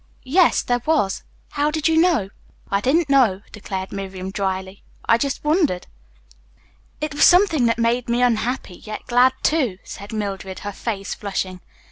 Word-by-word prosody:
"Yes, 335 +6 +3
there 245 0 0
was. 290 -12 +1 0.3
How 290 0 +1
did 310 0 0
you 325 - +2
know?" 320 - +3 0.4
"I 200 0 +1
didn't 300 +8 +2
know," 240 -9 +3
declared 190 -2 -6
Miriam 190 -1 -6
dryly. 190 -1 -3 0.2
"I 230 - +4
just 280 0 -2
wondered." 300 - +1 1.1
"It 305 0 -3
was 290 - +2
something 350 -9 +5
that 230 - +1
made 235 +1 0
me 240 +1 +2
unhappy, 235 -5 -1
yet 215 0 -8
glad, 250 +2 +4
too," 265 - +1
said 200 +1 -9
Mildred, 195 -3 -4
her 205 - -4
face 200 -1 -4
flushing. 190 -3 -4
230 Hz, 155 wpm, -21 LUFS, 195-290 Hz, 1.1 s, something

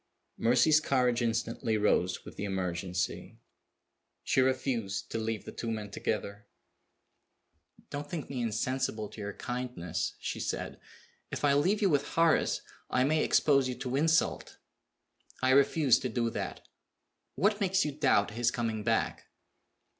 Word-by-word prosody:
Mercy's 125 +6 +5
courage 125 -5 +1
instantly 115 -1 0
rose 95 -3 +1
with - - -10
the - - -5
emergency. 90 -2 -3 0.9
She 130 - +2
refused 130 -6 -1
to 115 - -2
leave 110 -1 -3
the - - -7
two 115 - -5
men 105 -2 -4
together. 100 0 -3 1.4
"Don't 145 0 -5
think 160 -3 -4
me 130 -3 -4
insensible 115 -1 -1
to 110 - -10
your 100 0 -4
kindness," 120 -10 -3
she - - -4
said. - - -4 0.5
"If - - -2
I 140 - +4
leave 190 +10 +2
you 195 - +4
with 140 -1 +1
Horace 165 -1 +3 0.3
I 130 - +2
may 155 +3 +2
expose 140 -3 +3
you 125 - -3
to 125 +1 -4
insult. 160 +3 +1 0.9
I 130 - +4
refuse 140 -1 +4
to 130 - -3
do 115 0 -1
that. - - -5 0.7
What 205 +2 +1
makes 190 -2 +2
you 150 - -1
doubt 105 -8 +2
his 120 +2 +1
coming 115 -3 -2
back?" 115 0 0
125 Hz, 145 wpm, -30 LUFS, 110-140 Hz, 1.4 s, Mercy's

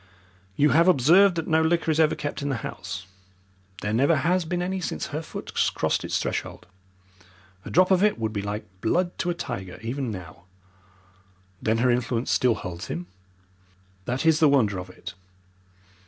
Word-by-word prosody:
You 150 +7 +4
have 165 +6 +4
observed 180 +5 +5
that 165 -1 -3
no 160 0 +3
liquor 165 0 +1
is 155 - 0
ever 155 -1 +4
kept 145 0 -4
in 145 - -2
the 125 -5 -3
house. 90 +1 -6 0.8
There 105 +1 -1
never 140 +8 +3
has 170 +5 +1
been 175 +2 -2
any 190 +1 -2
since 80 - -3
her - - -2
foot - - -8 0.2
crossed - - 0
its - - -1
threshold. - - -4 1.0
A - - -6
drop 185 +2 +4
of 190 +1 +4
it 210 - +3
would 110 -1 -2
be 100 - -2
like 100 +2 -4 0.2
blood 175 +9 0
to 175 - -1
a 175 - -1
tiger 95 - -6
even 125 +2 -3
now." 90 -4 -9 1.2
"Then 110 +1 +1
her 125 +2 +3
influence 120 0 -1
still 125 -3 +3
holds 90 -1 -7
him?" 85 +3 -4 1.0
"That 125 +7 -2
is 160 -1 +4
the 155 - +5
wonder 110 -9 +2
of 90 0 -8
it. 90 - -9
135 Hz, 180 wpm, -25 LUFS, 110-165 Hz, 1.2 s, observed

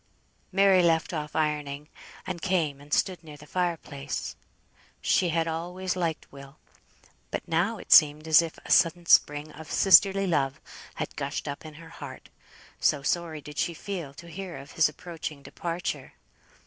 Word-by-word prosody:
Mary 195 -1 +5
left 165 0 +2
off 150 -2 -4
ironing, 150 -2 -1 0.4
and 170 - -5
came 160 -7 0
and 145 +1 -16
stood 180 +1 +1
near 150 -2 -11
the 150 - -13
fire 175 +1 -1
place. 140 -2 -6 0.6
She 180 - +2
had 165 0 0
always 180 +3 -3
liked 170 -3 -3
Will; 140 +1 -13 0.7
but - - -4
now 180 +8 +1
it - - -11
seemed 155 0 +7
as 160 +1 +7
if 165 -1 -6
a - - -5
sudden 170 +1 +4
spring 150 -2 +4
of 160 +1 -11
sisterly 195 +1 +6
love 140 -6 0 0.4
had - - -5
gushed - - -4
up 145 +2 -6
in 155 - -11
her 165 +1 -12
heart, 140 -5 -10 0.5
so 145 -2 +2
sorry 165 -1 -1
did 150 +1 -8
she 175 -1 0
feel 175 -6 -5
to 170 - -11
hear 180 +1 -7
of 140 - -11
his 160 -2 +3
approaching 155 -2 -7
departure. 165 -5 -4
160 Hz, 165 wpm, -27 LUFS, 150-175 Hz, 0.7 s, seemed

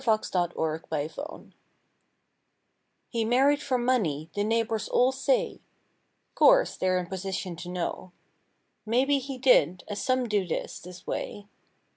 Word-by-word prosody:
185 190 -6 0 0.3
MARRIED 155 0 -2
FOR 305 +3 -7
MONEY - - -19 1.6
He 230 -2 0
married 270 +6 +3
for 265 -2 0
money, 185 - 0
the 205 - 0
neighbors 225 0 0
all 250 +1 +4
say; 270 - 0 0.7
('Course - - +5
they're 185 0 +1
in 180 - -2
position 190 0 -4
to 175 - -7
know) 180 +1 -4 0.7
May 235 +4 +2
be 280 0 +2
he 270 0 -6
did, 240 -9 +4
as 205 -1 -4
some 255 -2 +1
do 205 -4 0
this, - - -4
this 180 +1 -12
way. 205 - -4
220 Hz, 140 wpm, -27 LUFS, 180-255 Hz, 1.6 s, Course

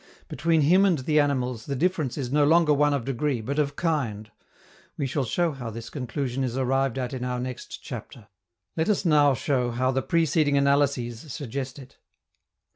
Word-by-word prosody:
Between 165 -1 +1
him 180 +7 +5
and 190 -5 +3
the 150 +3 +1
animals 125 -5 0
the 140 - -2
difference 155 -3 0
is 130 -4 -3
no 145 +1 +3
longer 160 0 +4
one 145 +1 +3
of 140 -5 -1
degree, 135 0 -1
but 140 +7 -3
of 140 -1 0
kind. 115 -11 -2 0.7
We 140 - -1
shall 135 +1 -1
show 170 +7 0
how 130 -5 -6
this 115 +1 -8
conclusion 130 -1 -3
is 125 -1 -2
arrived 135 0 0
at 125 0 -3
in 130 -2 -4
our 125 0 -2
next 125 0 -6
chapter. 110 -4 -9 0.5
Let 160 +3 0
us 200 -2 +1
now 145 -4 +4
show 125 -1 0
how 130 +2 0
the 135 0 0
preceding 155 -3 +2
analyses 140 -2 +1
suggest 135 -1 -5
it. 135 -1 -14
140 Hz, 185 wpm, -26 LUFS, 125-150 Hz, 0.7 s, him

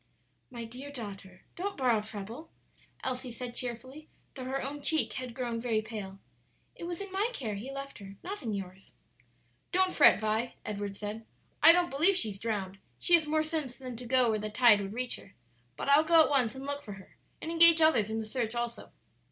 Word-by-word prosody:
"My 235 -2 -7
dear 255 +5 -9
daughter, 195 -7 -9
don't 395 +3 -4
borrow 245 -5 +2
trouble," 220 +8 -8 0.5
Elsie 255 -1 -3
said 240 +1 -6
cheerfully, 255 +5 -6 0.2
though 260 -2 -7
her 265 +1 -2
own 285 +2 -5
cheek 315 +2 +1
had 250 -2 -6
grown 240 -3 -3
very 225 -3 0
pale; 210 -3 -7 0.6
"it - - -8
was 345 +1 -5
in 400 -1 -7
my 400 +4 0
care 225 - -3
he 215 +7 -6
left 275 -1 -7
her, 195 -1 -10
not 400 +3 -5
in 230 -5 -3
yours." 195 -1 -7 0.8
"Don't 370 0 +2
fret, 290 - +7
Vi," 220 +2 -1
Edward 205 -1 -4
said; 210 +2 -6 0.4
"I 325 - +11
don't 350 0 +2
believe 330 +8 +4
she's 210 - 0
drowned; 195 -3 -3 0.2
she 350 - +1
has 325 -3 +6
more 310 +1 +2
sense 310 -5 -4
than 255 -2 -7
to 245 0 -8
go 250 -2 +4
where 215 - 0
the 215 0 -4
tide 210 -2 +5
would 195 +1 -5
reach 250 +1 -2
her; 195 - -16 0.4
but - - -4
I'll 285 +2 +6
go 325 0 +6
at 300 - -1
once 255 -6 +2
to - - -11
look 285 +1 -4
for 210 - -8
her, 190 -1 -14 0.2
and 325 - -5
engage 335 0 +7
others 255 -10 +4
in 220 - -2
the 220 - -4
search 230 0 -3
also." 235 0 -4
250 Hz, 210 wpm, -30 LUFS, 215-295 Hz, 0.8 s, I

